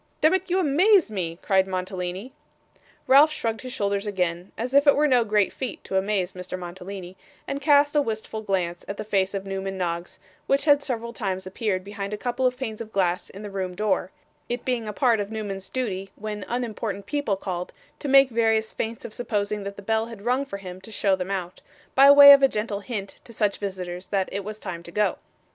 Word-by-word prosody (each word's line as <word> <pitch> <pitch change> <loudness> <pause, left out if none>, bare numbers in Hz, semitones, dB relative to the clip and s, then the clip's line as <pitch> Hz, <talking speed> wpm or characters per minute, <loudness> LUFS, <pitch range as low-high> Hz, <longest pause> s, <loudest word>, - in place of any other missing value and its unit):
'Demmit, 370 +4 +3
you 360 - +2
amaze 360 - +4
me,' 170 -5 -3
cried 190 -1 +3
Mantalini. 185 +4 -4 0.7
Ralph 285 +4 +7
shrugged 225 -7 -3
his 255 - -7
shoulders 200 -2 -1
again, 180 -2 -2
as 245 +3 -3
if 280 +1 +5
it 285 - +7
were 295 - +3
no 250 -4 +4
great 210 -3 +1
feat 260 -3 -5
to 190 - -5
amaze 190 -1 0
Mr. 185 0 -6
Mantalini, 180 +1 -8 0.3
and 280 0 -3
cast 290 0 +4
a 295 - +5
wistful 220 -3 -4
glance 180 -4 -2
at 200 - -5
the - - -4
face 195 -2 0
of 195 0 -4
Newman 195 0 -4
Noggs, 170 -1 -3 0.3
which 275 +2 +2
had 290 -2 +5
several 235 -4 -4
times 190 -4 -3
appeared 190 0 -2
behind 200 +1 -5
a - - -9
couple 245 +3 0
of 250 0 -2
panes 225 -4 -5
of 220 -1 -8
glass 180 -3 0
in 200 - -10
the 205 - -6
room 185 -2 -3
door; 195 -2 0 0.4
it 240 0 -3
being 245 -4 -1
a - - -2
part 240 -4 +3
of 205 0 -3
Newman's 205 -3 -5
duty, 195 -7 -3
when 210 -1 -5
unimportant 220 -4 -3
people 285 -4 -1
called, 180 -2 -4 0.3
to - - -5
make 270 -1 +6
various 225 -1 +1
feints 225 0 -4
of 215 - -7
supposing 210 -3 -2
that 200 0 -5
the 200 - -10
bell 220 +2 0
had 225 -4 -10
rung 255 +3 +1
for 200 - -5
him 185 -1 -9
to 190 - -12
show 200 -2 +1
them 185 0 -5
out: 185 -2 -4 0.3
by 275 +1 +7
way 285 0 +11
of 280 - +6
a 270 - +7
gentle 210 -4 -3
hint 200 -2 -6
to - - -13
such 210 -3 0
visitors 185 -2 -5
that 195 -2 0
it 200 +1 -3
was 215 +1 -6
time 180 -5 -6
to 170 - -12
go. 210 +3 +1
210 Hz, 215 wpm, -25 LUFS, 190-245 Hz, 0.7 s, way